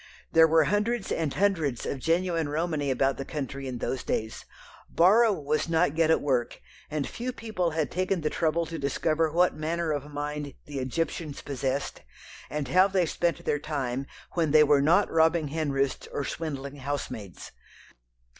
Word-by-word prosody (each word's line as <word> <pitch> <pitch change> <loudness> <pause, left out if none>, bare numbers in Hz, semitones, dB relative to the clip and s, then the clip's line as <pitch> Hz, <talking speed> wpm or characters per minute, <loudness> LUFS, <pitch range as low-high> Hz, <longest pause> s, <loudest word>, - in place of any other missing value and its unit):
There 160 0 +7
were 160 0 +5
hundreds 210 +5 0
and 160 -3 0
hundreds 165 -10 0
of 135 - -3
genuine 165 0 0
Romany 155 -2 -1
about 135 0 +1
the 135 - -3
country 135 -2 -5
in 125 -1 -4
those 130 +2 -2
days. 110 0 -3 0.4
Borrow 215 +7 +5
was 155 -2 -1
not 165 -2 +2
yet 165 -1 +3
at 160 - +4
work, 130 -4 0 0.3
and 150 -2 -2
few 250 +2 -4
people 215 -8 -2
had 155 - 0
taken 185 0 0
the 150 - -1
trouble 165 +1 +1
to 165 0 -6
discover 155 +3 0
what 180 +3 +3
manner 160 +2 -2
of 145 -1 -3
mind 145 0 -4
the 145 -2 -5
"Egyptians" 150 +3 -3
possessed, 135 0 -3 0.5
and 150 -2 -3
how 185 +6 +5
they 190 -3 +1
spent 170 -1 -1
their 145 - +1
time 135 -3 -3 0.2
when 165 -3 0
they 150 +1 +7
were 145 -1 +4
not 170 +8 +4
robbing 160 -1 +3
henroosts 140 -3 -1
or 140 - -3
swindling 140 -3 -5
housemaids. 130 -8 -5
155 Hz, 165 wpm, -27 LUFS, 140-170 Hz, 0.5 s, There